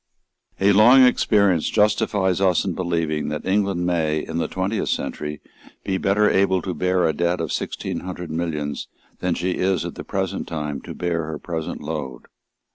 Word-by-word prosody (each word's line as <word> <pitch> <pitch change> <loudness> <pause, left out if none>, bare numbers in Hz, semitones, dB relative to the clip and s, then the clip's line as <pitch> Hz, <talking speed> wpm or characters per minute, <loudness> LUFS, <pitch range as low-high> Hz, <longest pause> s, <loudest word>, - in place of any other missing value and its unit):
A 100 +1 +4
long 120 +6 +7
experience 100 -8 +3
justifies 100 -3 +2
us 95 -2 +3
in 95 - -1
believing 85 -4 -1
that 75 0 -4
England 95 -2 +1
may, 80 -3 +1
in 80 +1 -3
the - - 0
twentieth 95 +4 -2
century, 75 0 -3 0.4
be 95 -1 -1
better 105 +2 +3
able 95 -2 +3
to 95 - -3
bear 90 +2 +1
a 80 - +1
debt 85 +3 0
of - - -3
sixteen - - -3
hundred 90 -2 -6
millions 80 -3 -3 0.3
than 90 -1 0
she 90 +1 -1
is 95 +1 0
at - - -5
the - - -8
present - - -3
time 75 -3 -4
to - - -8
bear 85 -2 -1
her 80 0 -5
present 80 0 -5
load. 75 -5 -5
90 Hz, 175 wpm, -22 LUFS, 80-95 Hz, 0.4 s, long